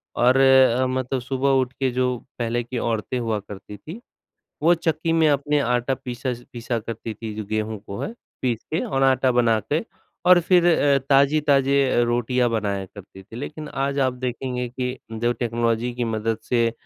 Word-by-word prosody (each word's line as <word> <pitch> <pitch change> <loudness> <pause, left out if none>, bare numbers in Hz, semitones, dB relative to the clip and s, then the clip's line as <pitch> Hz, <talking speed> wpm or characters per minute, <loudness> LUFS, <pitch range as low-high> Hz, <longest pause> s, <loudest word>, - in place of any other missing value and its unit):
और 125 +2 +4
अ, 130 -2 +5
मतलब 130 0 -2
सुबह 135 +2 -1
उठ 130 0 -4
के 135 -2 +1
जो 125 0 0 0.2
पहले 120 +1 -1
की 120 +1 -6
औरतें 115 +2 -2
हुआ 115 -3 -1
करती 105 +1 -10
थीं, 165 - -9 0.6
वो 170 +3 +5
चक्की 165 -1 -1
में 165 -1 +4
अपने 145 +1 +1
आटा 125 +1 0
पीस 125 -1 -8 0.3
पीसा 120 0 -3
करती 115 0 -6
थीं 110 0 -7
जो 110 - -4
गेहूँ 110 0 -2
को 100 - -6
है 220 - -4 0.3
पीस 120 -3 -1
के 165 - +1
और 135 0 -1
आटा 130 -1 +3
बना 120 -2 +3
के 155 - +2 0.4
और 180 -1 +7
फिर 175 0 +3
अ, 145 -5 +4
ताज़ी 140 +2 +4
ताज़े 140 -1 +3
अ, - - +2
रोटियाँ 120 +1 +1
बनाया 100 -3 -1
करती 95 0 -13
थीं, 105 +4 -13
लेकिन 150 +2 -6
आज 140 0 -2
आप 130 -1 +2
देखेंगे 125 0 -3
कि 125 +1 -4 0.2
जब 120 +2 0
टेक्नोलॉज़ी 115 0 0
की 120 0 -2
मदद 110 0 -1
से 115 -2 +2
125 Hz, 185 wpm, -23 LUFS, 115-135 Hz, 0.6 s, और